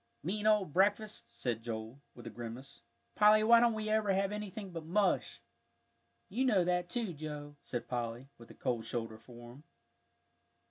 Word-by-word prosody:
"Mean 210 Hz, +6 st, -1 dB
old 210 Hz, -8 st, +3 dB
breakfast!" 205 Hz, +3 st, +2 dB
said 120 Hz, -3 st, -3 dB
Joel, 115 Hz, +3 st, -6 dB
with 120 Hz, -, -12 dB
a -, -, -6 dB
grimace. 120 Hz, +3 st, -8 dB, 0.3 s
"Polly, 215 Hz, 0 st, +6 dB
why 230 Hz, +1 st, +7 dB
don't 235 Hz, -1 st, +3 dB
we 215 Hz, 0 st, -3 dB
ever 215 Hz, -2 st, +2 dB
have 195 Hz, +1 st, +1 dB
anything 210 Hz, -1 st, -5 dB
but 165 Hz, -2 st, -6 dB
mush?" 195 Hz, +6 st, 0 dB, 0.8 s
"You 235 Hz, +7 st, -1 dB
know 210 Hz, -8 st, +4 dB
that 180 Hz, 0 st, 0 dB
too, 230 Hz, -7 st, -2 dB
Joe," 150 Hz, -1 st, -7 dB
said 120 Hz, -, -5 dB
Polly, 120 Hz, +1 st, -3 dB
with 115 Hz, -, -14 dB
a -, -, -13 dB
cold 120 Hz, -4 st, -1 dB
shoulder 115 Hz, -1 st, -4 dB
for 120 Hz, 0 st, -12 dB
him. 140 Hz, +5 st, -15 dB
175 Hz, 170 wpm, -33 LUFS, -, 0.8 s, why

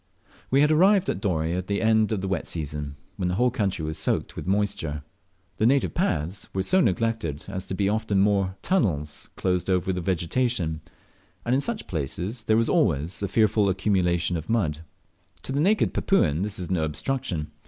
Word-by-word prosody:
We 135 Hz, +2 st, +4 dB
had 150 Hz, +1 st, +4 dB
arrived 190 Hz, +4 st, +4 dB
at 95 Hz, -, -5 dB
Dorey 80 Hz, -5 st, 0 dB
about 90 Hz, +1 st, -2 dB
the 100 Hz, 0 st, 0 dB
end 110 Hz, -1 st, +3 dB
of 105 Hz, -4 st, -1 dB
the 95 Hz, -, -3 dB
wet 95 Hz, -4 st, -2 dB
season, 75 Hz, -3 st, -5 dB, 0.2 s
when 90 Hz, -, -1 dB
the 90 Hz, -, 0 dB
whole 125 Hz, +4 st, +2 dB
country 95 Hz, -8 st, -1 dB
was 80 Hz, 0 st, -3 dB
soaked -, -, -1 dB
with -, -, -6 dB
moisture 95 Hz, -7 st, -1 dB, 0.5 s
The 110 Hz, -, +3 dB
native 135 Hz, +2 st, +2 dB
paths 95 Hz, -, -1 dB
were 95 Hz, -, +1 dB
so 185 Hz, -, +4 dB
neglected 110 Hz, -, -1 dB
as 95 Hz, -2 st, -6 dB
to 95 Hz, -, -3 dB
be 100 Hz, 0 st, +1 dB
often 105 Hz, -2 st, +1 dB
mere 100 Hz, -2 st, +1 dB
tunnels 75 Hz, -, 0 dB
closed 90 Hz, 0 st, -1 dB
over 95 Hz, 0 st, +1 dB
with 90 Hz, -1 st, -3 dB
vegetation, 90 Hz, -1 st, -1 dB, 0.6 s
and 120 Hz, -, +1 dB
in 135 Hz, -, +3 dB
such 220 Hz, +5 st, -3 dB
places 90 Hz, -, -3 dB
there 110 Hz, -, +3 dB
was 115 Hz, 0 st, +2 dB
always 85 Hz, -, +1 dB
a 100 Hz, -, 0 dB
fearful 105 Hz, -1 st, +3 dB
accumulation 90 Hz, -3 st, +1 dB
of 80 Hz, -, -7 dB
mud. 85 Hz, -10 st, +1 dB, 0.6 s
To -, -, -5 dB
the 140 Hz, -, 0 dB
naked 200 Hz, +7 st, +2 dB
Papuan 80 Hz, -, +2 dB
this 105 Hz, +1 st, -2 dB
is 90 Hz, -1 st, -4 dB
no 85 Hz, -4 st, +1 dB
obstruction. 85 Hz, -, -2 dB
95 Hz, 190 wpm, -25 LUFS, 85-115 Hz, 0.6 s, We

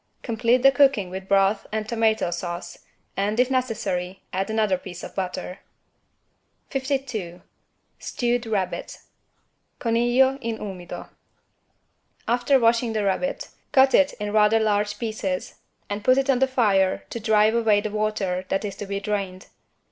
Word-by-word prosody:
Complete 240 Hz, +1 st, +1 dB
the 270 Hz, -, +8 dB
cooking 270 Hz, -10 st, +3 dB
with 190 Hz, +1 st, -6 dB
broth 195 Hz, +1 st, +2 dB
and 215 Hz, 0 st, -2 dB
tomato 220 Hz, -5 st, +1 dB
sauce 175 Hz, 0 st, -5 dB, 0.4 s
and, 205 Hz, +3 st, -1 dB
if 250 Hz, +1 st, +3 dB
necessary, 195 Hz, -8 st, -2 dB
add 190 Hz, +2 st, -1 dB
another 215 Hz, -3 st, +2 dB
piece 180 Hz, -1 st, -9 dB
of -, -, -8 dB
butter. 185 Hz, 0 st, -4 dB, 1.1 s
52 260 Hz, -10 st, -3 dB, 0.6 s
STEWED 240 Hz, -1 st, -1 dB
RABBIT 195 Hz, -4 st, -2 dB, 0.8 s
(Coniglio 240 Hz, +3 st, +2 dB
in 230 Hz, -2 st, -3 dB
umido) 185 Hz, -5 st, -7 dB, 1.2 s
After 245 Hz, +3 st, +3 dB
washing 230 Hz, 0 st, +2 dB
the 215 Hz, -1 st, 0 dB
rabbit, 270 Hz, -, -1 dB, 0.2 s
cut 265 Hz, 0 st, +5 dB
it 285 Hz, 0 st, +4 dB
in 210 Hz, 0 st, -5 dB
rather 215 Hz, +1 st, +4 dB
large 205 Hz, -1 st, 0 dB
pieces 215 Hz, -5 st, -3 dB, 0.3 s
and 205 Hz, 0 st, -4 dB
put 255 Hz, +2 st, +4 dB
it 270 Hz, 0 st, +3 dB
on 250 Hz, -, +1 dB
the 265 Hz, -, +3 dB
fire 205 Hz, -7 st, +2 dB
to 235 Hz, -, -4 dB
drive 215 Hz, 0 st, +3 dB
away 225 Hz, -3 st, +3 dB
the 210 Hz, 0 st, -4 dB
water 210 Hz, -4 st, -1 dB
that 195 Hz, +2 st, -1 dB
is 200 Hz, -, -5 dB
to 205 Hz, -, -6 dB
be 200 Hz, 0 st, -2 dB
drained. 195 Hz, -2 st, -4 dB
215 Hz, 145 wpm, -24 LUFS, 195-240 Hz, 1.2 s, the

